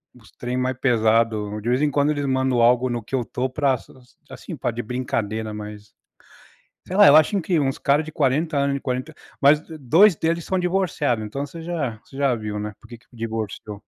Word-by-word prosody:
os 105 -7 -19
trem 125 +1 -4
mais 130 +1 -1
pesado, 110 -3 +1
de 115 - -3
vez 125 +1 +2
em 150 - +2
quando 145 +1 +2
eles 145 -1 -2
mandam 130 -2 +1
algo 125 +2 +4
no 120 -2 -3
que 125 - -18
eu 125 - 0
tô 125 +3 -2
para 135 0 +1
para, 130 - -18 0.3
assim, - - -8
pra - - -1
de 120 +1 -4
brincadeira, 110 -3 -3
mas, 105 0 -9 0.9
sei 185 - -5
lá, 205 - +8
eu 145 - +8
acho 155 +6 +4
que 170 -1 +1
uns 135 -2 0
cara 145 +3 +2
de 155 - -9
40 150 +2 0
anos 140 0 +1
de - - -2
40, 130 +4 -4 0.3
mas 145 +2 +5 0.2
2 165 - +5
deles 165 +1 -1
são 190 - 0
divorciado, 175 - 0
então 120 +7 -4
você 165 +4 -10
já 150 -10 -3
você 135 - -13
já 135 -3 +2
viu, 105 -1 -5
né, 105 0 -5
por 115 - -17
que 120 - -9
que - - -30
divorciou. 110 -2 -5
130 Hz, 215 wpm, -22 LUFS, 115-150 Hz, 0.9 s, lá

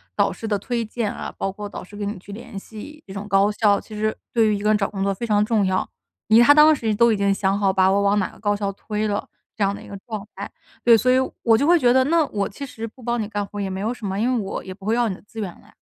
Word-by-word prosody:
导 - - +2
师 225 - -7
的 210 -2 +1
推 235 +3 -2
荐 220 -1 -3
啊， - - -6
包 195 - -2
括 205 +1 -7
导 - - -8
师 195 +3 -14
跟 205 0 -4
你 205 -1 -4
去 195 +3 -12
联 235 0 -9
系 230 +10 -11
这 190 - -9
种 200 +1 -6
高 200 +1 +3
校， 205 -1 +3
其 215 - -11
实 215 +1 -1 0.2
对 225 -2 +4
于 210 - +2
一 - - -3
个 210 - +2
人 215 - +4
找 200 -2 -1
工 195 -2 -3
作 200 0 +1
非 215 +5 -5
常 210 -1 +3
重 215 -2 +2
要。 185 0 0 0.4
已 220 +2 +7
他 285 +4 +8
当 305 +1 +7
时 225 -6 -1
都 235 +2 +4
已 210 - -1
经 200 0 +2
想 195 0 0
好 195 -2 +3
把 190 -1 +4
我 200 +1 +2
往 200 +1 +3
哪 190 - 0
个 - - -17
高 205 -1 +1
校 200 -1 -2
推 210 +1 -3
了， 205 -1 -2 0.3
这 210 - -1
样 195 0 +2
的 - - -10
一 - - -12
个 200 - -8
状 215 -2 -6
态。 - - -6 0.3
对， 235 -1 +7
所 250 +4 +1
以， - - +5 0.3
我 225 -1 +5
就 275 - +1
会 345 0 +5
觉 245 -3 +4
得， 260 - +5
那 330 +1 +3
我 200 -2 -2
其 280 +8 -7
实 230 -4 -7
不 250 - -16
帮 240 +1 -1
你 - - -2
干 205 -1 -2
活 205 - -10
儿 - - -1
也 195 - -2
没 190 0 -4
有 225 +4 -1
什 225 - -9
么， 195 +1 -2
因 245 +4 +1
为 - - +1
我 195 - -4
也 185 - -7
不 195 0 -15
会 220 - +1
要 240 -1 +2
你 190 - -3
的 - - -16
资 225 +2 -11
源 200 -4 -2
了 - - -20
呀。 - - -21
210 Hz, 355 characters per minute, -22 LUFS, 200-230 Hz, 0.4 s, 他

